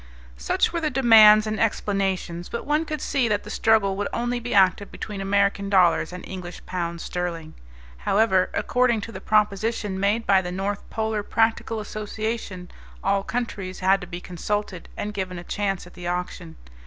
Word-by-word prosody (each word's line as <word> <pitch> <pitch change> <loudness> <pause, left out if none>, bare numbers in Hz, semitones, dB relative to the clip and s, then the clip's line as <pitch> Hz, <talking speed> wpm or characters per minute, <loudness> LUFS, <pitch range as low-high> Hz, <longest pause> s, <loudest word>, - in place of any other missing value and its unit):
Such 65 - +1
were 340 - -1
the 310 - +1
demands 220 -5 +7
and 215 0 -3
explanations, 195 -5 -1
but 235 - -5
one 300 +2 +1
could 305 -3 -4
see 270 -4 +1
that 210 -2 0
the 210 - -8
struggle 215 -3 +3
would 205 - -1
only 240 +1 -1
be 240 +1 -6
active 195 0 +3
between 205 -2 -6
American 200 0 +1
dollars 180 -4 +3
and 180 0 -8
English 180 -2 -8
pounds 170 -2 -4
sterling. 170 -3 -4 0.4
However, 190 - +2
according 245 -3 +1
to 225 - -7
the - - -8
proposition 210 -1 0
made 205 +4 +1
by 195 -1 +4
the 180 -1 -5
North 195 +2 -3
Polar 220 -1 -1
Practical 225 +1 0
Association 215 -3 -5 0.3
all 195 0 +2
countries 195 -5 -4
had 195 +1 +3
to 180 - -7
be 175 0 -6
consulted 185 +1 -4
and 210 0 -4
given 185 -3 -4
a 175 - -7
chance 195 0 -2
at 180 - -15
the 175 -1 -7
auction. 175 -1 -4
200 Hz, 175 wpm, -24 LUFS, 185-220 Hz, 0.4 s, demands